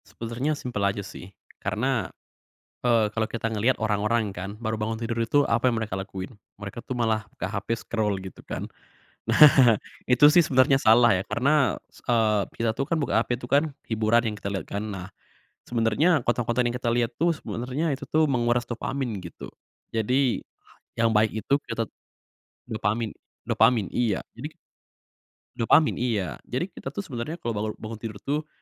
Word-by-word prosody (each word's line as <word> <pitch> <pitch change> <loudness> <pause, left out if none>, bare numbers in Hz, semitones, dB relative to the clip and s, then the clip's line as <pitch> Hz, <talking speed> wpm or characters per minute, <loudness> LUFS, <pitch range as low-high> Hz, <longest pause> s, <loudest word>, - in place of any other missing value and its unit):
Sebenernya 125 +6 -3
simpel 120 -6 -4
aja 100 0 0
sih 95 -2 -10 0.3
karena, 115 -3 -1 0.7
eee, 115 -3 +3
kalau 110 -1 0
kita 115 0 -3
ngeliat 115 +5 +2
orang-orang 105 0 0
kan 95 +2 -5
baru 110 -1 -2
bangun 110 +1 -2
tidur 115 0 -3
itu 145 +6 +3
apa 115 +2 +2
yang 115 - -1
mereka 110 -3 -3
lakuin? 95 +3 -6 0.2
Mereka 100 +3 -7
tuh 130 - -5
malah 110 -2 +1
buka - - -5
HP, 100 0 -5 0.2
scroll 105 -3 0
gitu 95 -1 -10
kan. - - -5 0.6
Nah, 130 -7 +7 0.3
itu 125 +3 +6
sih 175 - +7
sebenernya 135 -1 +4
salah 115 +1 +6
ya 90 - -1
karena 140 +5 +2
s - - -19
eee, 110 -4 +2
kita 115 -1 0
tuh - - -1
kan 165 - +1
buka 145 - -1
HP - - -27
tuh 120 - -8
kan 145 +2 +6 0.2
hiburan 110 +1 +2
yang - - -6
kita 100 - -4
liat 95 -5 -3
kan. 100 +1 -3
Nah 95 -2 -6 0.6
sebenernya 115 +6 +2 0.2
konten-konten 120 0 +1
yang 120 - -3
kita 120 -1 -2
lihat 120 -1 +1
tuh 170 +1 +4
sebenernya 130 +4 -3
itu 135 - -4
tuh 155 0 +3
menguras 120 -2 +1
dopamin 125 -1 -3
gitu. 85 -2 -9 0.4
Jadi 125 +3 +1 0.6
yang 115 0 +3
baik 110 0 +3
itu 140 - +2
kita 115 -1 -1
t - - -70 0.8
dopamin 110 0 -1 0.3
dopamin, 115 -7 +3
iya 110 -6 0
jadi 150 +6 -6 1.0
Dopamin, 150 +6 +4
iya, 105 - -1
jadi 125 +5 -1
kita 135 -3 -8
tuh 200 - -3
sebenernya 135 -1 -5
kalau 120 -9 -4
balau 105 0 -2
bangun 110 0 -8
tidur 110 -2 -6
tuh, 150 +2 -2
115 Hz, 170 wpm, -26 LUFS, 110-125 Hz, 1.0 s, Nah